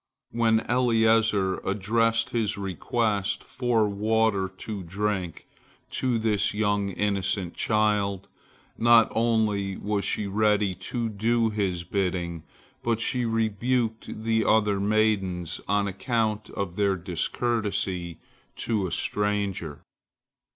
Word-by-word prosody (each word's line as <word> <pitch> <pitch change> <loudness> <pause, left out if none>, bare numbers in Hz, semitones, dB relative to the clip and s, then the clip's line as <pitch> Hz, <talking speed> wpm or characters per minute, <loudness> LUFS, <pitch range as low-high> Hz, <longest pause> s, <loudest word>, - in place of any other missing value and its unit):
When 115 -1 +2
Eliezer 110 -5 +2
addressed 115 +4 0
his 110 -3 0
request 100 +2 -1
for 120 -4 +1
water 105 -1 +1
to 105 -1 -5
drink 95 -1 -3 0.5
to 125 -3 0
this 105 -2 +1
young 100 -1 +1
innocent 100 -2 -1
child, 105 -3 0 0.5
not 115 -1 +6
only 110 -4 +1
was 105 -1 -2
she 105 - 0
ready 105 -1 +2 0.2
to 120 -2 -1
do 115 +2 +1
his 95 -5 -1
bidding, 90 -3 -2 0.4
but 115 -1 0
she 125 +1 0
rebuked 115 0 -1
the 110 0 +2
other 105 -3 +3
maidens 100 -5 0
on 100 0 +1
account 110 +1 -1
of 95 -3 -4
their 100 -2 +2
discourtesy 90 -1 -2 0.4
to 105 -5 -1
a - - -7
stranger. 100 -7 -1
105 Hz, 110 wpm, -26 LUFS, 100-115 Hz, 0.5 s, not